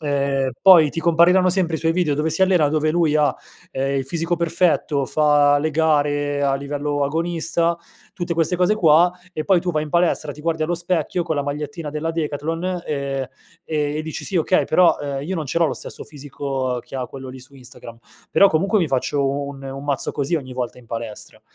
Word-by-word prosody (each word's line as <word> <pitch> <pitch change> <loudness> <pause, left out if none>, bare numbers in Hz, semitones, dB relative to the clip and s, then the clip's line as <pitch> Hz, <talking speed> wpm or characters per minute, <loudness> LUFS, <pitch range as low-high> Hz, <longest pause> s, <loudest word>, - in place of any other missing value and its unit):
ehm, 140 -2 0
poi 180 -5 +8
ti 165 - -4
compariranno 175 +3 +4
sempre 175 -3 +1
i - - -6
suoi 165 0 +1
video 165 -4 +1
dove 150 +2 -1
si 160 +4 -1
allena, 180 -6 +4
dove 155 +1 +1
lui 165 -2 +1
ha, 150 -1 +2 0.4
ehm, 135 +1 -1
il 135 - -3
fisico 170 +3 -1
perfetto, 165 -4 +1
fa 145 0 +3
le 155 +2 -1
gare 145 -2 +1
a 140 -1 +2
livello 145 +1 -3
agonista, 165 +2 0 0.4
tutte 175 -1 -3
queste 165 +2 +1
cose 180 +4 +2
qua, 175 -2 +4 0.2
e 155 -3 -4
poi 190 -3 +3
tu 180 - -2
vai 155 -2 -1
in 150 - -10
palestra, 170 -4 +1
ti 150 - -13
guardi 160 0 -1
allo 175 +2 -1
specchio, 175 0 -1
con 165 -2 -3
la 145 - 0
magliettina 145 +2 -5
della 155 +2 -3
Decathlon, 165 +3 -3
ehm, 140 -2 -3 0.4
e 150 -1 -2
dici 160 0 -6
sì 195 - -2
okay, 175 +2 +2
però, 175 +2 +4
uhm, 140 -1 -4
io 185 +6 -4
non 155 -3 -4
ce 150 - -1
l'ho 170 - +3
lo - - -2
stesso - - -6
fisico 135 -3 -4
che - - -8
ha 125 -1 -3
quello 135 -1 -9
lì 130 +1 -9
su 130 +2 -14
Instagram, 125 -3 -12 0.3
però 200 +5 +6
comunque 195 +6 +1
mi 165 - 0
faccio 135 +1 0 0.2
un 140 -1 -8
un 135 +1 -7
mazzo 140 -2 0
così, 145 +4 -1
ogni 130 -4 -6
volta 125 -1 -4
in 125 - -17
palestra, 115 -2 -6
150 Hz, 210 wpm, -21 LUFS, 140-170 Hz, 0.4 s, poi